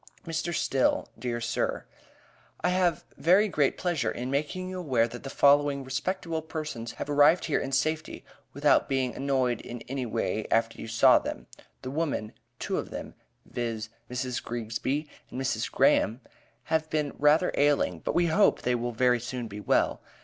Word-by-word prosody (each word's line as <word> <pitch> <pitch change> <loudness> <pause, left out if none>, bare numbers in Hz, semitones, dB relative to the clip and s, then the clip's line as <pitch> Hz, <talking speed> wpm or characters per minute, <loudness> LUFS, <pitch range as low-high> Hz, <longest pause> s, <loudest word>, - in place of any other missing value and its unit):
MR. 165 +1 -2
STILL, 135 -5 +1
DEAR 120 -2 -2
SIR: 120 0 -2 0.8
I 180 - +2
have 180 -2 +1
very 190 +6 +4
great 150 -7 +1
pleasure 165 -10 0
in 125 +2 -4
making 155 +6 -2
you 185 0 -5
aware 130 -9 +2
that 120 +1 -9
the 135 - -7
following 140 0 +4
respectable 160 +5 -2
persons 155 -8 -5
have - - -6
arrived 145 +4 +4
here 155 - +1
in 135 - -4
safety 155 +3 -1 0.3
without 145 0 +3
being 130 -3 0
annoyed 130 -4 0
in 120 -1 -8
any 130 0 -4
way 110 -1 -2
after 115 0 +1
you - - -6
saw 115 +1 +5
them. - - -6 0.4
The 130 - -4
women, 145 -8 -2 0.2
two - - -2
of - - -5
them, - - -7 0.3
viz: 115 -2 -4 0.2
Mrs. 125 0 -3
Greegsby 120 +6 -3 0.2
and - - -6
Mrs. 130 - -1
Graham, 115 +4 +3 0.4
have 160 -1 -1
been 150 -2 -1
rather 150 +5 +4
ailing, 140 - +2
but - - -3
we 175 - +4
hope 170 +5 +3
they 125 - +1
will 120 0 -2
very 125 +1 +3
soon 125 0 -5
be 105 -1 -8
well. 105 - +1
135 Hz, 170 wpm, -28 LUFS, 120-155 Hz, 0.8 s, saw